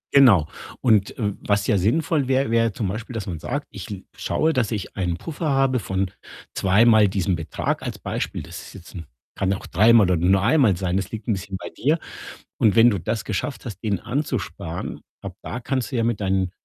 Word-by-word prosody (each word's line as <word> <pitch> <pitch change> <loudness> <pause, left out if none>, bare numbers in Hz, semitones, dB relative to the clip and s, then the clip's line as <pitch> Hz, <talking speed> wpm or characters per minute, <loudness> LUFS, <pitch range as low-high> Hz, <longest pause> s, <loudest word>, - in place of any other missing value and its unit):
Genau, 110 - +7 0.3
und, 110 -6 +2
äh, 105 -4 -1
was 100 0 +1
ja 100 - +2
sinnvoll 145 - +1
wär, 135 -1 +1
wär 115 -1 +3
zum 100 0 -3
Beispiel, 115 +5 -5
dass 110 -4 -3
man 85 -5 -5
sagt: 145 - -4
„Ich - - -8
l 100 -2 -7
ich - - -15
schaue, 160 +1 +1
dass 125 -6 +1
ich 105 -4 -4
einen 90 -3 -1
Puffer 160 - -4
habe 135 -2 +2
von 95 -2 -2 0.4
zweimal 110 +2 +5
diesem 95 -1 0
Betrag“, 80 -2 -3
als - - -5
Beispiel. - - -4
Das - - -9
ist - - -12
jetzt - - -12
'n 85 - -7 0.3
kann 95 0 0
auch 95 - -6
dreimal 110 +3 +5
oder - - +4
nur 95 +4 +3
einmal 120 - +4
sein, 90 0 -1
das 95 0 -2
liegt 110 -1 -7
'n 115 - +2
bisschen 95 0 -5
bei - - -7
dir. 150 +5 +2 0.6
Und 110 -3 +4
wenn 115 +1 +7
du 100 - -1
das 110 +6 -3
geschafft 120 +8 -3
hast, 110 -5 -7
den 100 -4 0
anzusparen, 125 - -4 0.2
ab - - -7
da 125 - -5
kannst 130 +1 -2
du - - -3
ja 115 - +1
mit 115 -2 0
deinen 95 -2 0
105 Hz, 215 wpm, -23 LUFS, 95-125 Hz, 0.6 s, Genau